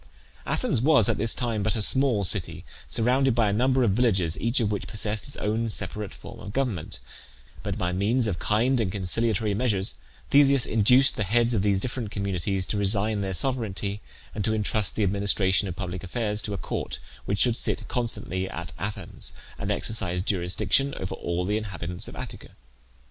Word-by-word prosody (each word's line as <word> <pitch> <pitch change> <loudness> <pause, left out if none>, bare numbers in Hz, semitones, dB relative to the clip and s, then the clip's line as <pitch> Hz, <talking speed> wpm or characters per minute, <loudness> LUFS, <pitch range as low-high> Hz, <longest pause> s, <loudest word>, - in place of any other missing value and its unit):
Athens - - +1
was 140 -6 +5
at - - 0
this 115 +2 +2
time 115 -4 -1
but 110 +2 0
a 110 - -1
small 130 -4 +2
city 85 -3 +2 0.2
surrounded 125 +2 +2
by 115 -3 +3
a - - -1
number 130 +4 +2
of 110 - +3
villages, 95 -7 +2
each 115 +3 +1
of 110 -3 0
which 105 - -3
possessed 105 +1 -1
its 140 - -4
own 110 +2 -1
separate 105 -1 -3
form - - -11
of 100 - -8
government; 120 - -2 0.6
but - - -4
by 90 - -1
means 105 +7 +1
of 95 -7 -2
kind 120 +4 +1
and 95 -5 -1
conciliatory 105 +2 +1
measures 105 -3 0 0.3
Theseus 140 -2 +5
induced 125 +5 +4
the 105 - 0
heads 120 +4 +2
of 105 - +1
these 100 -1 +2
different 120 0 -2
communities 95 -1 -1
to 105 - -3
resign 100 +1 0
their 95 -1 -3
sovereignty, 105 -5 -2 0.3
and 105 - -3
to 110 +2 +1
intrust 105 -1 0
the 110 - 0
administration 100 0 +2
of 90 - -5
public 90 -1 -5
affairs 105 +1 -1
to 105 - -4
a - - -4
court - - -4 0.3
which 100 - -1
should 120 +2 +3
sit - - -2
constantly 95 -6 -2
at 85 -5 -6
Athens, 100 +2 -4 0.3
and - - -3
exercise 90 -5 +2
jurisdiction 100 +9 +1
over 95 - -4
all 85 +1 -2
the 105 +3 0
inhabitants 90 -4 -5
of - - -9
Attica. - - -8
105 Hz, 185 wpm, -26 LUFS, 95-115 Hz, 0.6 s, was